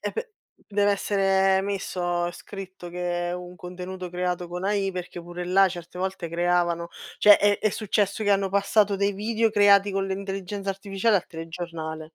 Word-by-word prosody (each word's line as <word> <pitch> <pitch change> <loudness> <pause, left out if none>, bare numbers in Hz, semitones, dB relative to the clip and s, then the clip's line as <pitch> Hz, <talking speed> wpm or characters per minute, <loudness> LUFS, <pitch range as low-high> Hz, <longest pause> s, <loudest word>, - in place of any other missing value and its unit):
E - - -3
p 465 +1 -4 0.4
deve 205 0 +2
essere 195 -1 +2
messo, 175 -3 -2
scritto 190 -1 -9
che 175 0 -2
è - - -3
un 180 0 -8
contenuto 180 +1 -7
creato 180 -1 -2
con 180 +2 -5
AI, 200 -1 +1
perché 180 -1 -6
pure 175 +1 -7
là 190 +2 +4
certe 175 0 -8
volte 190 -2 -3
creavano 170 0 +1 0.3
cioè, 210 -1 +8
è 205 0 +3
è 215 - +1
successo 205 0 0
che 205 - +2
hanno 195 -1 +3
passato 200 +1 +2
dei 200 +1 +1
video 220 +3 0
creati 205 -1 +5
con 195 0 0
l'intelligenza 195 0 -4
artificiale 195 +2 +1
al 180 - -2
telegiornale. 165 -1 -6
190 Hz, 170 wpm, -25 LUFS, 175-200 Hz, 0.4 s, cioè